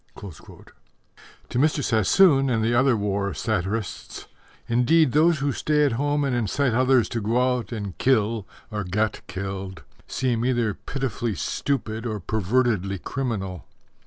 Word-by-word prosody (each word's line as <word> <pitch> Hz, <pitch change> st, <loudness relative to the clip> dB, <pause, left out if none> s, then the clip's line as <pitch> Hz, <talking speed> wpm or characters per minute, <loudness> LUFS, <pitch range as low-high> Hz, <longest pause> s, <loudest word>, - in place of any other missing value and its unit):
_ 95 Hz, -7 st, -12 dB, 0.8 s
To 120 Hz, -, -1 dB
Mr. 150 Hz, 0 st, +2 dB
Sassoon 135 Hz, -, +4 dB
and 115 Hz, -3 st, +1 dB
the 115 Hz, +2 st, +1 dB
other 130 Hz, 0 st, +3 dB
war 100 Hz, -3 st, -1 dB
satirists, 95 Hz, +7 st, -3 dB, 0.4 s
indeed, 125 Hz, +5 st, +3 dB
those 155 Hz, +2 st, +3 dB, 0.2 s
stay 150 Hz, -1 st, +2 dB
at 140 Hz, -, +1 dB
home 145 Hz, +5 st, 0 dB
and 135 Hz, -3 st, 0 dB
incite 120 Hz, +3 st, 0 dB
others 130 Hz, 0 st, +3 dB
to 115 Hz, -, -3 dB
go 125 Hz, +4 st, +1 dB
out 120 Hz, -, -9 dB
and 100 Hz, -5 st, -5 dB
kill 115 Hz, -4 st, +1 dB, 0.2 s
or 105 Hz, -1 st, -3 dB
get 105 Hz, +4 st, -1 dB
killed 95 Hz, -1 st, -6 dB, 0.2 s
seem 120 Hz, -3 st, -1 dB
either 120 Hz, -4 st, +1 dB
pitifully 120 Hz, -3 st, -3 dB
stupid 115 Hz, -4 st, -2 dB
or 110 Hz, -2 st, -3 dB
pervertedly 105 Hz, 0 st, 0 dB
criminal. 100 Hz, -, -4 dB
115 Hz, 135 wpm, -24 LUFS, 100-130 Hz, 0.8 s, Sassoon